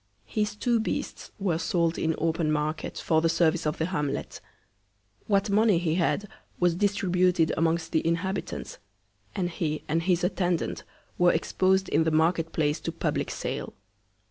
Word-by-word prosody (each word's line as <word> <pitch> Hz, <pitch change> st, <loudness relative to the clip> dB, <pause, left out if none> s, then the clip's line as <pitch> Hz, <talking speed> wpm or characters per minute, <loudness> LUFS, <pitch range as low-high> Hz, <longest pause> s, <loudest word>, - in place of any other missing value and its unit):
His 210 Hz, -2 st, -2 dB
two 235 Hz, +2 st, +1 dB
Beasts 220 Hz, -, -3 dB
were 185 Hz, -6 st, 0 dB
sold 170 Hz, 0 st, 0 dB
in 160 Hz, 0 st, 0 dB
open 160 Hz, -1 st, 0 dB
Market, 155 Hz, +1 st, -2 dB
for 160 Hz, -1 st, +2 dB
the 165 Hz, -, +2 dB
Service 165 Hz, -1 st, +2 dB
of 150 Hz, -, -1 dB
the 160 Hz, -, 0 dB
Hamlet; 150 Hz, -6 st, -3 dB, 0.9 s
What 200 Hz, 0 st, +2 dB
Money 210 Hz, -2 st, +4 dB
he 165 Hz, -2 st, 0 dB
had 185 Hz, +4 st, 0 dB, 0.3 s
was 175 Hz, -1 st, +3 dB
distributed 180 Hz, -3 st, +2 dB
amongst 165 Hz, 0 st, 0 dB
the 160 Hz, -, +1 dB
Inhabitants; 185 Hz, +4 st, -3 dB, 0.6 s
and 180 Hz, -, 0 dB
he 160 Hz, -3 st, -3 dB
and 165 Hz, +2 st, +1 dB
his 180 Hz, 0 st, +1 dB
Attendant 180 Hz, -2 st, -1 dB, 0.4 s
were 175 Hz, 0 st, +6 dB
expos'd 190 Hz, +3 st, +1 dB
in -, -, +2 dB
the 160 Hz, -, +1 dB
Market 165 Hz, +1 st, +2 dB
place 150 Hz, 0 st, 0 dB
to 165 Hz, -, -4 dB
public 165 Hz, -, -2 dB
Sale. -, -, -4 dB
170 Hz, 155 wpm, -27 LUFS, 160-185 Hz, 0.9 s, were